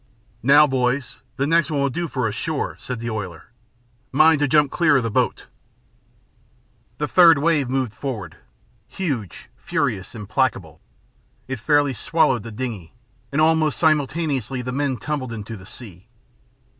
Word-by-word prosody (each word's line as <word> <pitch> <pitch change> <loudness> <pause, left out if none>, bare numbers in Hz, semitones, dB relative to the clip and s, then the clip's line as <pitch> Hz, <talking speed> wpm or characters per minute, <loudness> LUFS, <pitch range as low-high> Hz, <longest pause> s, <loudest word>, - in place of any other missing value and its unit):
"Now, 145 +5 +6
boys, 130 -1 -1
the 135 - 0
next 165 0 +2
one 150 -2 -1
will 140 -1 +1
do 170 +5 -3
for 130 -4 -1
us, 105 - -3
sure," 155 +6 -3
said 125 -2 -5
the 115 0 -3
oiler. 95 -5 -6 0.6
"Mind 155 +2 +5
to 145 - +2
jump 150 0 +3
clear 155 -5 +3
of 130 - 0
the 115 - -2
boat." - - 0 1.5
The 150 - -2
third 170 -3 +6
wave 145 -3 +1
moved 130 -4 -1
forward, 110 - -6 0.5
huge, 125 - -5
furious, 95 +4 -2
implacable. 105 - -2 0.7
It 135 -2 -4
fairly 145 +2 +2
swallowed 130 -2 +1
the 115 +2 -9
dingey, 110 -7 -6 0.4
and 140 - -1
almost 155 -1 +3
simultaneously 145 -5 0
the 125 - -4
men 135 -1 -1
tumbled 130 +1 -4
into 115 0 -6
the 95 -2 -12
sea. 100 -4 -12
130 Hz, 150 wpm, -22 LUFS, 115-150 Hz, 1.5 s, Now